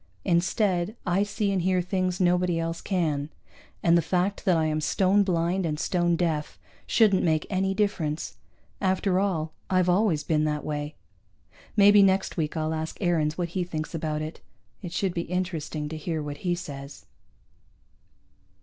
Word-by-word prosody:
Instead, 185 +2 +1
I 180 +1 +2
see 205 0 -1
and 190 -2 0
hear 185 +1 +2
things 185 0 -1
nobody 180 -1 +2
else 165 0 -3
can, 155 -6 -1 0.5
and 170 0 +5
the 170 - +5
fact 185 +5 -1
that 180 -4 +4
I 160 - +2
am 155 0 0
stone 190 +6 +3
blind 180 0 +1
and 150 -3 -2
stone 175 -1 +1
deaf 160 -3 -1 0.3
shouldn't 210 -5 +4
make 160 -2 +1
any 190 0 0
difference. 170 -7 -1 0.4
After 190 0 +1
all, 165 -6 -1 0.2
I've 185 -1 +2
always 180 -4 +2
been 155 -1 +1
that 150 -1 -1
way. 150 0 -4 0.8
Maybe 205 0 +7
next 190 0 +2
week 160 -1 -2
I'll 155 0 -1
ask 160 0 -4
Aarons 165 -4 +1
what 175 -2 -2
he 180 +2 -1
thinks 160 -2 -5
about 155 -1 -2
it. 155 +1 -7 0.4
It 180 -4 -6
should 190 0 -1
be 170 - -1
interesting 165 -4 -3
to 160 - -5
hear 155 0 -3
what 145 -1 -5
he 175 -1 -1
says. 140 -5 -8
175 Hz, 165 wpm, -26 LUFS, 155-190 Hz, 0.8 s, Maybe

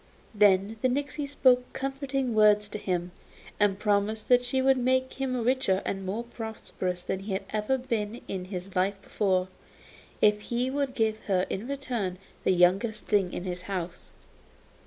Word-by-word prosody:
Then 205 0 +4
the - - +4
nixy 285 +3 -2
spoke 255 -3 +3
comforting 270 -2 -2
words 210 -1 +5
to 210 - -5
him, 180 -2 -2 0.5
and 205 -2 +3
promised 210 +1 0
that 245 0 +6
she 250 +2 0
would 265 0 +4
make 260 +1 +1
him 255 -3 -2
richer 245 -6 +2
and 195 -1 -2
more 215 +5 -2
prosperous 220 -6 -5
than 190 - -2
he 195 +1 -5
had 190 - -2
ever 215 +5 +1
been 230 -3 -3
in 185 -2 -4
his 185 0 -7
life 195 +2 +1
before, 190 -3 +1 0.7
if 210 0 +4
he 245 +4 -1
would 275 -2 -1
give 220 -1 +1
her 185 -2 +2
in 205 +5 -3
return 245 -9 -3 0.3
the - - +3
youngest 190 +5 +3
thing 195 -4 +2
in - - -4
his 180 -1 -4
house. 180 -3 -5
215 Hz, 165 wpm, -28 LUFS, 190-255 Hz, 0.7 s, that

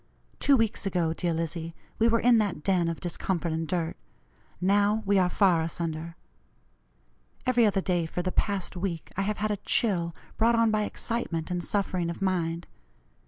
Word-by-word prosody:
Two 280 -1 +4
weeks 225 -3 0
ago, 175 -4 0
dear 175 +1 -1
Lizzie, 165 0 -3 0.2
we 225 - +5
were 230 0 +3
in 240 -1 +5
that 200 -7 -1
den 180 -3 +2
of 165 -1 -3
discomfort 175 -1 -2
and 160 0 -2
dirt. 165 0 -1 0.6
Now 205 +3 +2
we 200 0 +3
are 180 -1 +3
far 180 -4 +3
asunder. 165 0 -4 1.3
Every 245 -3 +4
other 195 -1 +1
day, 175 -3 0
for 175 +2 -3
the 185 - -1
past 200 -2 -1
week, 175 -3 -4
I 195 - 0
have 210 +1 -1
had 215 0 -1
a 205 - -1
chill, 180 -5 +1 0.2
brought 230 +1 +4
on 230 -1 +3
by 215 -1 +1
excitement 185 -9 -3
and 175 -1 -2
suffering 185 -4 0
of 170 - -5
mind. 170 -3 -1
185 Hz, 175 wpm, -28 LUFS, 170-210 Hz, 1.3 s, we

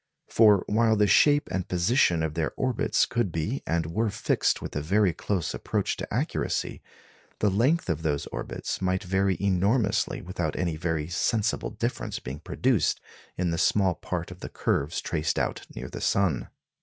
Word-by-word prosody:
For 105 -4 +5
while 110 +1 +3
the 105 0 +4
shape 145 +8 +4
and 95 -1 -2
position 90 - +2
of 80 -1 -2
their 80 0 -1
orbits 130 -3 +1
could 120 -6 -1
be 85 - -2
and 80 -1 0
were 110 +8 0
fixed 105 +1 +1
with - - -7
a 75 - -1
very 95 +3 +2
close 85 -1 -2
approach - - -1
to - - -6
accuracy, - - -2 0.6
the 105 - +2
length 130 - +2
of 80 -3 -1
those 75 -3 -1
orbits - - -4
might 95 0 0
vary 95 0 +1
enormously 100 +3 +1
without 85 -4 -3
any 85 -3 -1
very 80 -2 -2
sensible 105 +5 0
difference - - -3
being 65 +3 -7
produced 120 - +1 0.4
in 90 -1 0
the 85 - -1
small 95 +1 +3
part - - -5
of - - -10
the - - -7
curves 75 +5 -1
traced 80 -2 -1
out - - -2
near - - -6
the - - -8
sun. 100 -4 +1
95 Hz, 170 wpm, -27 LUFS, 85-105 Hz, 0.6 s, For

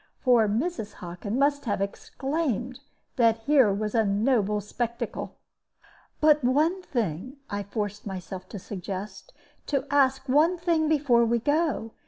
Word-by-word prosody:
For 240 -4 +4
Mrs. 225 +1 -2
Hockin 180 +6 -5
must 285 +1 +1
have 205 -4 -1
exclaimed 255 +4 -3 0.4
that 230 -2 +4
here 265 -4 +4
was 210 +1 -2
a 225 -2 +3
noble 210 0 +1
spectacle. 235 +3 -4 0.8
"But 300 -2 +4
one 310 +9 +2
thing," 235 - -3
I 205 0 -2
forced 205 +1 -4
myself 185 0 -7
to - - -7
suggest; 195 - -7 0.4
"do 275 -3 0
ask 270 -1 +2
one 310 +7 +3
thing 330 -3 +1
before 275 -6 +3
we 235 +1 +2
go. 290 -2 0
235 Hz, 135 wpm, -26 LUFS, 205-285 Hz, 0.8 s, For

